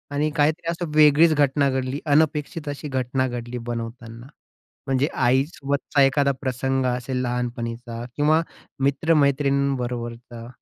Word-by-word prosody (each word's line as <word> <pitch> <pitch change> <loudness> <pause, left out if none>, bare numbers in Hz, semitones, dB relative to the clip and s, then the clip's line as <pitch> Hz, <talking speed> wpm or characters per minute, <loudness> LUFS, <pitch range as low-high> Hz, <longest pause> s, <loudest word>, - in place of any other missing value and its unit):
आणि 150 +2 +1
काहीतरी 155 +2 +1
असं 170 -1 -4
वेगळीच 155 +2 +6
घटना 140 -1 +2
घडली, 130 +1 -2
अनपेक्षित 150 +1 +1
अशी 145 +1 -5
घटना 130 -1 -1
घडली 120 0 -5
बनवताना, 115 0 -6 0.6
म्हणजे 135 +1 +1
आईसोबतचा 140 +2 0
एखादा 140 +1 +3
प्रसंग 130 0 -1
असेल 125 +1 -2
लहानपणीचा 120 -1 -4
किंवा 155 +2 +3 0.4
मित्र-मैत्रिणींबरोबरचा? 135 -5 0
135 Hz, 105 wpm, -23 LUFS, 125-145 Hz, 0.6 s, वेगळीच